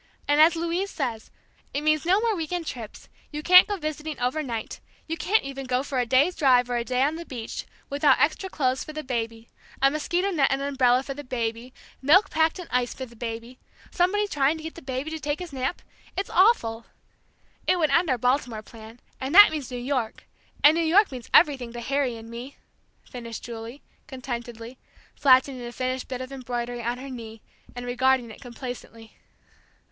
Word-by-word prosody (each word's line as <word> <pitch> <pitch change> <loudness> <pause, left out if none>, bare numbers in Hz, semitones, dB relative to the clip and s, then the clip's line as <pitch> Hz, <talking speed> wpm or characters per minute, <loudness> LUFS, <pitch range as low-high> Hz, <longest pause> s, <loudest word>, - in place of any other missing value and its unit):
And 290 +1 +4
as 325 +2 +6
Louise 340 +4 -1
says 245 - -4 0.5
it 285 - 0
means 310 +1 +1
no 380 +3 +4
more 455 -2 +1
week 325 -3 -4
end 350 -2 -2
trips; 230 -7 -8 0.2
you 300 0 -5
can't 365 +2 +8
go 410 -1 -2
visiting 310 -2 -5
over 250 +5 0
night, 235 -6 -5 0.3
you 325 - -3
can't 400 +7 +1
even 275 -1 -6
go 255 +1 0
for 275 -2 -2
a 245 - 0
day's 280 +9 +3
drive 250 -4 +3
or 240 - +1
a 235 - -1
day 250 +2 0
on 300 +3 0
the 340 - -6
beach, 240 -8 -6 0.2
without 285 +1 +3
extra 325 +6 +1
clothes 260 -6 0
for 310 - -9
the 310 0 -5
baby, 230 -3 -4 0.3
a 275 +1 +4
mosquito 345 +6 -1
net 290 -7 +3
and 270 - 0
an 280 +1 -2
umbrella 255 -2 +3
for 275 - -5
the 290 +2 -8
baby 235 -1 -3 0.3
milk 320 +10 +5
packed 320 +2 +2
in 360 -3 -8
ice 250 -1 0
for 260 - -5
the 235 -1 -17
baby 230 +2 -6 0.3
somebody 390 +4 +2
trying 290 -3 +1
to 315 - -10
get 320 - -6
the 335 - -11
baby 265 +3 -4
to 320 - -4
take 290 0 -2
his 355 -5 -8
nap 265 +5 -3 0.3
it's 390 - -2
awful! 235 - +3 0.8
It 365 - +4
would 310 -4 +2
end 335 +3 +3
our 255 - +2
Baltimore 245 -2 0
plan, 225 +1 -13 0.2
and 270 +5 -3
that 410 -2 +10
means 300 -5 -4
New 250 - -5
York, 245 -2 -3 0.4
and 295 - +8
New 335 - +1
York 375 +5 +4
means 250 -3 -8
everything 260 -7 +4
to 240 - -6
Harry 265 -1 -1
and 225 0 -11
me!" 240 +4 -8 0.5
finished 235 -2 -8
Julie, 235 +3 -8 0.2
contentedly, 240 -2 -7 0.3
flattening 260 -1 +4
a 240 - -6
finished 255 +1 -3
bit 255 -1 -5
of 255 +1 -7
embroidery 245 -2 -4
on 240 +1 -2
her 270 +1 -8
knee, 225 -3 -9 0.3
and 245 0 -6
regarding 250 -1 +1
it - - -13
complacently. 240 -3 -9
265 Hz, 205 wpm, -25 LUFS, 245-310 Hz, 0.8 s, that